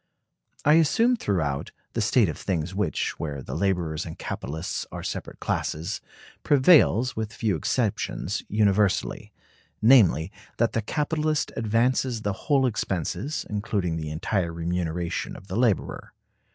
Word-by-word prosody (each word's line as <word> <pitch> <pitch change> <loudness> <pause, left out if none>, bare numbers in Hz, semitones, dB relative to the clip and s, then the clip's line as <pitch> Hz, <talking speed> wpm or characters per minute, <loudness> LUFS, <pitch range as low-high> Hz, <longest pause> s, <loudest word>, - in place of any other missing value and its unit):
I 150 - +6
assume, 230 - +3
throughout, 80 - -1 0.2
the - - 0
state - - +3
of - - -3
things 90 -1 -2
which, 100 0 -1
where 70 -4 -4
the 65 - -7
laborers 85 -2 0
and 80 - -8
capitalists 80 +5 -4
are - - -6
separate - - -5
classes, 85 +8 -2 0.4
prevails, 130 - +5
with 110 -1 -3
few 110 -3 0
exceptions, 80 - -1
universally; 105 -2 +1 0.5
namely, 105 -8 +5 0.3
that 115 0 +2
the 115 - +1
capitalist 150 +5 -1
advances 115 +1 +1
the 100 - 0
whole 135 +6 +1
expenses, 100 - -2
including 100 -4 -1
the 80 -1 -4
entire 85 +3 -1
remuneration 85 0 -2
of - - -12
the 95 - -3
laborer. 115 -4 0
100 Hz, 130 wpm, -26 LUFS, 85-120 Hz, 0.5 s, I